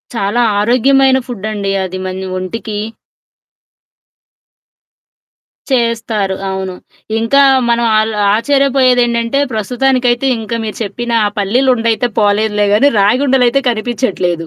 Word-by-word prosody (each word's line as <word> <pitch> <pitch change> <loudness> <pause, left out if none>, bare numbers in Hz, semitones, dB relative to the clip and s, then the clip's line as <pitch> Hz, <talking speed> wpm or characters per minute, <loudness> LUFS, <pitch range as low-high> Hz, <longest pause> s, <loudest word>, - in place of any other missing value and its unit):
చాలా 210 +3 0 0.2
ఆరోగ్యమైన 265 +4 +3
ఫుడ్డండి 210 -4 -4
అది 185 0 -6
మన 185 0 -5
ఒంటికి. 210 +3 -5 2.9
చేస్తారు. 225 -5 -1
అవును. 190 -1 -4 0.4
ఇంకా 275 +5 +3 0.3
మనం 235 0 +1
ఆల్ 220 +1 0 0.2
ఆశ్చర్యపోయేదేంటంటే, 250 -1 +1
ప్రస్తుతానికైతే 250 +3 0
ఇంక 225 +1 -8
మీరు 215 - -6
చెప్పిన 235 +4 -5
ఆ - - +1
పల్లీలుండైతే 230 +2 +1
పోలేదులే 210 0 +1
గానీ, 280 +7 +4
రాగుండలయితే 255 +4 +2
కనిపిచ్చట్లేదు. 210 -8 -2
230 Hz, 90 wpm, -14 LUFS, 205-255 Hz, 2.9 s, గానీ